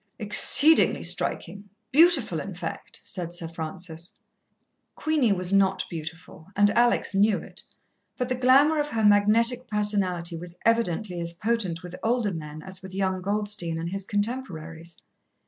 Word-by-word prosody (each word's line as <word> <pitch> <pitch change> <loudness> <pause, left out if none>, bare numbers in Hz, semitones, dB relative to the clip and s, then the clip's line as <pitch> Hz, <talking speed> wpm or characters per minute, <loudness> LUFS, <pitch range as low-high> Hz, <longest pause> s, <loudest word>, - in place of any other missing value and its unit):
"Exceedingly 285 +8 +6
striking 200 0 -3 0.2
beautiful, 335 +5 +3
in - - -7
fact," - - -7
said 175 -3 -3
Sir 170 -1 -4
Francis. 165 +1 -5 0.8
Queenie 305 -8 0
was 185 -1 +1
not 190 -1 +2
beautiful, 160 0 -9
and 205 0 +4
Alex 240 -1 +1
knew 205 +1 +3
it, - - -6 0.6
but 250 - -2
the 255 - -1
glamour 270 +5 +4
of 295 - -1
her 225 -6 -1
magnetic 230 +5 +3
personality 195 -5 -1
was 170 +1 -9
evidently 215 -5 0
as 170 0 -4
potent 185 -3 -2
with 180 0 -9
older 230 -3 0
men 155 -1 -8
as 190 -1 -7
with 190 0 -10
young 190 -1 -1
Goldstein 205 -4 -1
and 165 +1 -4
his 195 0 -4
contemporaries. 180 -7 -5
195 Hz, 145 wpm, -25 LUFS, 170-230 Hz, 0.8 s, Exceedingly